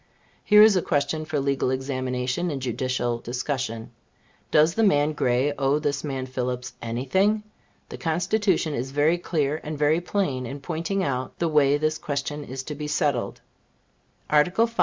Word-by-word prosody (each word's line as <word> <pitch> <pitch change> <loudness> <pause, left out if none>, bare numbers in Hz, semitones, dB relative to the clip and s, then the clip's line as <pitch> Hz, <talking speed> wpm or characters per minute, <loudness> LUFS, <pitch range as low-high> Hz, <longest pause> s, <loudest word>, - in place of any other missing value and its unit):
Here 210 0 +7
is 215 -2 +6
a 185 - +3
question 150 +1 -1
for 155 -2 -1
legal 140 -1 0
examination 130 +3 -2
and 145 -4 -3
judicial 125 -1 -1
discussion. 120 -2 -4 0.6
Does 155 +2 +4
the 225 - 0
man 155 -7 +3
Gray 130 +1 +1
owe 135 +1 +2
this 145 -2 -2
man 135 -3 -3
Phillips 125 -1 -4
any 120 +2 -3
thing? 205 +9 +2 0.5
The - - -8
Constitution 180 0 +1
is 130 0 -3
very 150 +5 +2
clear 155 -3 -1
and 155 0 -5
very 150 +3 +2
plain 145 -10 -1
in 140 +4 -6
pointing 170 +6 -2
out 130 -4 -3
the 170 - 0
way 145 -2 +4
this 155 +1 -1
question 145 +1 -3
is 130 -1 -6
to 150 - -6
be 150 0 -5
settled. 145 -4 -1 0.9
Article 180 +9 +3
V. 230 0 -10
145 Hz, 165 wpm, -25 LUFS, 130-160 Hz, 0.9 s, Here